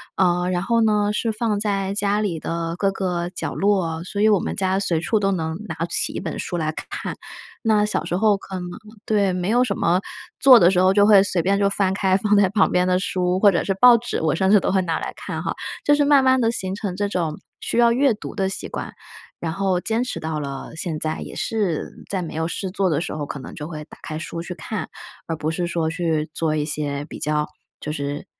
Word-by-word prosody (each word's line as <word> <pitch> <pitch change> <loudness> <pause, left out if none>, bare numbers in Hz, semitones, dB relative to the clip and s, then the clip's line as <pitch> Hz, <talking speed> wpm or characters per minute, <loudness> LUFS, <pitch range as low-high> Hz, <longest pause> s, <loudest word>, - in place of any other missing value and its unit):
呃， 180 -1 +2
然 180 0 -1
后 230 +3 +2
呢， 210 -1 +2
是 220 +2 -1
放 215 -2 -1
在 195 -2 -1
家 205 +1 +1
里 175 -6 -2
的 165 +1 -3
各 195 - +2
个 180 -3 -2
角 - - -4
落， 185 -5 0
所 200 +2 -3
以 215 - +5
我 205 -4 +4
们 - - -3
家 190 0 +1
随 170 -5 0
处 220 +5 +1
都 195 -1 +1
能 160 -3 -2
拿 160 0 -3
起 - - 0
一 - - -3
本 - - -5
书 - - -4
来 155 -2 -1
看。 - - -6 0.5
那 215 -2 +3
小 210 - -2
时 175 - -2
候 210 +1 +3
可 195 0 -9
能 180 - -5 0.4
对， 200 -3 +2
没 180 +2 -2
有 245 +2 +4
什 200 -5 -2
么 175 +2 +2 0.4
做 260 -2 +9
的 180 -4 +6
时 180 - +2
候 185 +1 +4
就 205 0 +5
会 205 -2 +7
随 190 -3 +1
便 200 +3 +1
就 200 - +3
翻 195 -1 +1
开 190 -1 +2
放 205 +2 +1
在 200 -1 +5
旁 200 +1 +2
边 180 0 +2
的 180 0 +3
书， 185 -1 0
或 205 - +7
者 170 - +1
是 195 - +1
报 240 +5 +7
纸， 235 +1 -3
我 160 -2 +1
甚 190 +2 +1
至 210 - +8
都 - - 0
会 190 0 +3
拿 165 -2 -1
来 - - -4
看 - - -5
哈。 - - -1 0.3
就 290 - +4
是 290 0 +3
慢 280 -2 +5
慢 260 0 +4
地 230 -2 +2
形 190 -4 -3
成 200 -3 -4
这 205 0 -1
种 165 -5 -2 0.2
需 - - -3
要 235 -1 +5
阅 260 0 +3
读 210 - -8
的 195 - 0
习 195 - -5
惯， - - -6 0.5
然 165 - -3
后 190 0 0
坚 225 +2 0
持 250 - -4
到 160 -1 -3
了 140 -2 -6
现 160 -1 -3
在， 155 0 -2
也 - - -8
是 205 -8 -2
在 190 -2 -2
没 165 - -6
有 160 +1 -1
事 190 +3 -3
做 190 0 0
的 160 -2 +1
时 - - -4
候， 150 - -3
可 140 - -6
能 130 - -9
就 150 - -6
会 155 -2 -7
打 - - -15
开 155 -1 -5
书 165 0 -5
去 180 - -6
看， 180 +2 -5 0.4
而 165 - -3
不 155 0 -2
是 175 +2 -1
说 170 -2 -1
去 160 -2 -1
做 160 -2 0
一 150 - 0
些 145 -2 -2
比 - - -9
较 150 0 0 0.3
就 150 - -5
是 145 -1 -4
185 Hz, 270 characters per minute, -22 LUFS, 165-205 Hz, 0.5 s, 做